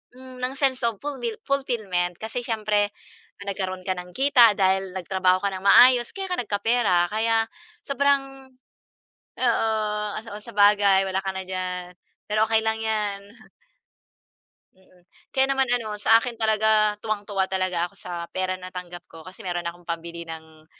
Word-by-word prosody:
hmm, 255 0 -12
ng 255 +1 -1
sense 265 -2 +1
of 225 - -3
fulmil 245 -6 -3
fulfillment. 215 -11 -1
Kasi 225 +3 -4
siyempre, 210 -2 0 0.5
nagkaroon 190 -2 -4
ka 185 - 0
ng 180 0 -9
kita 260 -5 +6
dahil 190 -1 +1
nagtrabaho 185 0 +1
ka 200 - +2
ng 185 - -6
maayos, 245 +3 +7
kaya 385 -1 -5
ka 360 - 0
nagkapera. 205 -4 +1
Kaya 225 +1 +1 0.4
sobrang 270 -1 0 0.9
oo, 235 -3 +2 0.5
oh, - - -2
saba 210 -2 -8
sabagay 205 -1 +4
wala 190 - -1
ka 195 - -2
na 190 - -3
diyan, 180 -1 -4 0.4
pero 215 +1 +3
okey 220 0 +3
lang 220 0 +1
yan. 205 -2 -2 1.4
Mm, 185 -1 -26 0.2
kaya 265 0 +2
naman 265 -2 +1
ano, 230 -3 -1
sa 225 +2 +6
akin 240 +1 -2
talaga, 220 -1 +2
tuwang-tuwa 205 -2 -2
talaga 185 -2 -1
ako 175 - -12
sa 175 -3 -6
pera 185 0 -1
natanggap 180 -1 -9
ko. 165 - -13
Kasi 185 +5 -12
meron 175 -1 -3
akong 175 +1 -14
pambili 170 0 -5
ng 160 -1 -11
205 Hz, 155 wpm, -24 LUFS, 185-230 Hz, 1.4 s, maayos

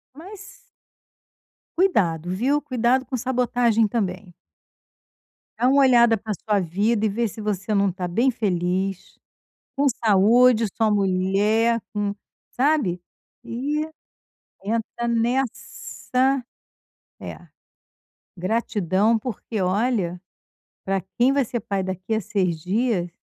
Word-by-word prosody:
Mas 390 +6 -12 1.2
Cuidado, 180 - +1
viu, 260 +11 +1
cuidado 255 -2 +1
com 255 - -3
sabotagem 240 -2 +1
também. 190 -4 -3 1.2
Dá 245 - +2
uma 280 +1 +4
olhada 240 -4 +5
pra 215 +1 -4
sua 205 +3 -1
vida 205 +5 0
e - - +2
vê 230 +3 -1
se 215 - -10
você 210 -1 -2
não 200 -1 +2
tá 180 0 -4
bem 235 +9 +2
feliz, 190 -3 -2 0.6
com 285 +1 +1 0.2
saúde. 225 +3 +5
Sua 220 -2 +2
mulher 205 +4 +2
com 205 -1 -1 0.4
sabe. 260 - +1 0.4
E 290 +6 -2 0.8
entra 230 +2 -3
nessa 255 +2 -1 0.8
É. - - -9 0.9
Gratidão, 205 +1 +1
porque, 220 -2 -5
olha, 185 -2 0 0.6
pra 195 0 0 0.2
quem 245 +2 +4
vai 280 -2 +2
ser 240 +1 -3
pai 200 -1 -2
daqui 185 +3 -4
a 220 - +1
6 185 -5 -1
dias, 195 -1 0
220 Hz, 110 wpm, -23 LUFS, 190-245 Hz, 1.2 s, olhada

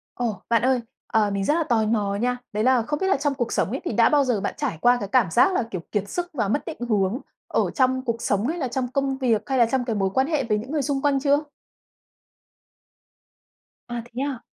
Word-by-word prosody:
Ồ, 225 -6 -2
bạn 230 -2 +3
ơi! 255 -1 +2 0.3
Ờ, 215 -2 +2
mình 200 0 -1
rất 295 - +3
là 330 +1 +1
tò 235 -6 +1
mò 210 -2 0
nha. 250 +4 0 0.2
Đấy 210 +1 0
là 255 0 +4
không 295 +5 -3
biết 380 - 0
là 390 - +3
trong 285 +1 0
cuộc 240 -3 -2
sống - - +1
ấy, 265 - -3
thì - - -1
đã 230 +1 +5
bao 290 -2 +4
giờ 245 -6 0
bạn - - -2
trải 160 - -2
qua 245 0 +5
cái 200 - -4
cảm 235 -10 +3
giác 310 - +4
là, 305 - +1
kiểu, 185 - -4
kiệt 205 -1 -1
sức 355 0 -3
và 225 -8 0
mất 220 +9 -1
định 325 - -6
hướng 205 +2 +1 0.3
ở - - 0
trong 260 -2 +2
cuộc 230 -2 -2
sống 205 +3 0
hay 330 +4 -2
là 280 -6 -1
trong 250 +1 -2
công 270 +1 -1
việc 235 -5 +1
hay 265 - +1
là 240 - +6
trong 245 +2 -1
cái 230 -3 -1
mối 195 -2 +1
quan 265 +4 +2
hệ 305 -4 0
với 215 -4 0
những 230 +6 -6
người 305 -2 0
xung 275 0 -1
quanh 280 -1 +2
chưa? 285 +1 +3 2.5
À, 240 -1 -4
thế 240 +2 -6
à? 280 -4 -3
245 Hz, 255 wpm, -24 LUFS, 220-275 Hz, 2.5 s, là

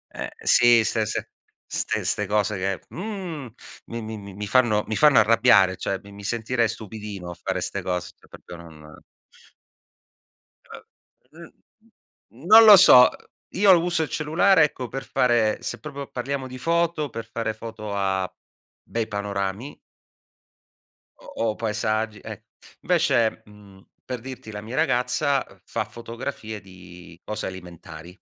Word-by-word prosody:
eh - - -5
sì, 120 -2 +5
ste 110 -2 0
ste - - -5
ste 105 - 0
cose 105 0 0
che, 95 0 -2
mhmm, 180 - -6 0.4
mi 115 0 -6
mi 110 0 -6
mi 100 -1 -10
mi 105 0 -5
fanno 110 -3 +3
mi 110 - -2
fanno 150 -3 +5
arrabbiare, 95 -4 +4
cioè 95 - -3
mi 100 - -14
mi 100 0 -12
sentirei 115 +2 0
stupidino 105 -5 -7
a - - -9
fare - - -3
'ste - - -3
cose, 90 -1 -3
cioè - - -24
proprio 85 - -12
non 80 -3 -14 2.4
Uhm, - - -13 0.8
mhmm, 125 +8 -17
non 220 +2 +9
lo 210 -2 +11
so. 125 -7 +8 0.5
Io 190 -1 +6
uso 170 -1 0
il - - -7
cellulare 160 +3 +3
ecco, 130 -4 -4
per 135 +2 -6
fare 120 -2 +1
se - - -5
proprio 140 -2 -8
parliamo 130 +1 -4
di 130 0 -9
foto, 165 -1 0
per 115 -1 -7
fare 115 -1 -3
foto 110 -2 -7
a 95 -2 -1 0.5
bei 115 -1 -3
panorami 100 +5 -4 1.4
o 115 -1 -3
o - - -13
paesaggi, 110 -1 -2
eh - - -9 0.4
invece, 110 -1 +1
mhmm, 100 -2 -17 0.2
per 125 -2 -5
dirti 130 -3 -9
la 105 -1 -7
mia 110 +5 -7
ragazza 135 -1 +1 0.2
fa - - -3
fotografie 115 -2 -7
di 90 -2 -14
cose 105 - -5
alimentari. 85 -3 -10
110 Hz, 140 wpm, -24 LUFS, 100-130 Hz, 2.4 s, lo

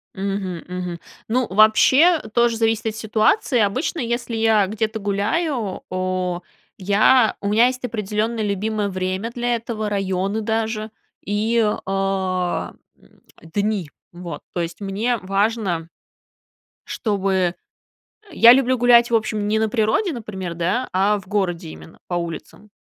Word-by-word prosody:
Мгм, 190 -3 -3
мгм. 180 -1 -5 0.3
Ну, 245 +1 0
вообще 260 - +5
тоже 235 -1 +2
зависит 225 -1 0
от 220 - -2
ситуации. 225 - +1
Обычно, 240 +11 0
если 235 -1 -2
я 220 -3 +3
где-то 220 +1 -2
гуляю, 210 - -1
о, 185 -1 -2 0.4
я 215 +5 +4
у 200 - -1
меня 230 +4 +5
есть 255 0 -4
определенное 215 0 -2
любимое 205 +1 -1
время 185 +4 -3
для 240 0 -1
этого, 220 -2 -4
районы 195 +1 -1
даже 220 0 -2 0.3
и, 220 +3 +1 0.2
а, 190 -2 -1 0.3
м, - - -23 0.4
дни, 205 -5 -1 0.2
вот. 175 -4 -8
То 175 - -1
есть, 170 +4 -5
мне 215 +5 -1
важно, 195 -4 -1 1.0
чтобы 190 -4 -1 0.8
я 235 -6 +8
люблю 260 0 +2
гулять, 240 -1 +5
в - - +4
общем, 215 -2 -1
не 220 +1 +1
на 220 - +1
природе, 225 - +1
например, 190 - -6
да, 185 +10 -1
а 200 +3 +2
в 185 - -16
городе 185 - -2
именно 80 0 -13
по 175 - -3
улицам. 170 +4 -6
210 Hz, 135 wpm, -21 LUFS, 190-230 Hz, 1.0 s, я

